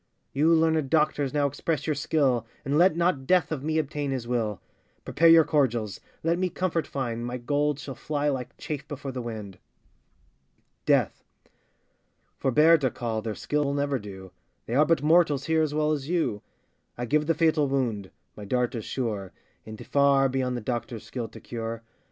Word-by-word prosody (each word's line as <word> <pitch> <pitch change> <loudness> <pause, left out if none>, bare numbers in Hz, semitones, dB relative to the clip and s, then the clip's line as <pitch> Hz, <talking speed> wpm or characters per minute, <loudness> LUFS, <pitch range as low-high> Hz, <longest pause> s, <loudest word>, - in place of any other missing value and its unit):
You 155 +4 +4
learnèd 160 -3 +2
doctors, 150 -3 +1
now 145 -1 +1
express 145 +3 -2
your 155 - +1
skill, 135 -5 +1 0.2
And 140 +1 0
let 170 +1 +4
not 170 -6 +1
Death 180 -2 +3
of 145 -4 -3
me 155 +1 0
obtain 145 -2 -2
his 130 -3 -3
will; 115 -4 -1 0.5
Prepare 165 - +3
your 165 0 +8
cordials, 120 -9 0 0.2
let 165 +2 +1
me 185 0 +1
comfort 175 -3 -1
find, 120 -4 -3
My 120 +1 -3
gold 145 +3 0
shall 145 -2 -7
fly 145 +2 -2
like 130 -4 -3
chaff 150 -1 -5
before 145 -2 -6
the 130 -1 -5
wind. 110 -5 -7 1.3
DEATH. - - +2 1.2
Forbear 155 +5 +5
to 135 -3 +1
call, 115 -2 -3
their 110 -1 -4
skill 150 0 -1
will 140 0 -1
never 140 -2 0
do, 95 -3 -10 0.3
They 115 - -5
are 150 +4 +4
but 165 -4 +2
mortals 150 -3 +3
here 160 -1 +2
as 150 -1 -1
well 155 0 +1
as 145 -1 -3
you: 165 - 0 0.6
I 120 - -3
give 150 +4 +1
the 165 - +2
fatal 155 -2 +2
wound, 120 -8 -1 0.3
my 105 - -9
dart 125 +4 0
is 115 -3 -5
sure, 105 -7 -3 0.3
And 110 -1 -9
far 140 -1 +4
beyond 130 -1 -1
the - - -5
doctor's 120 -1 -4
skill 120 -3 -5
to - - -12
cure. 115 -1 -6
140 Hz, 180 wpm, -26 LUFS, 120-155 Hz, 1.3 s, your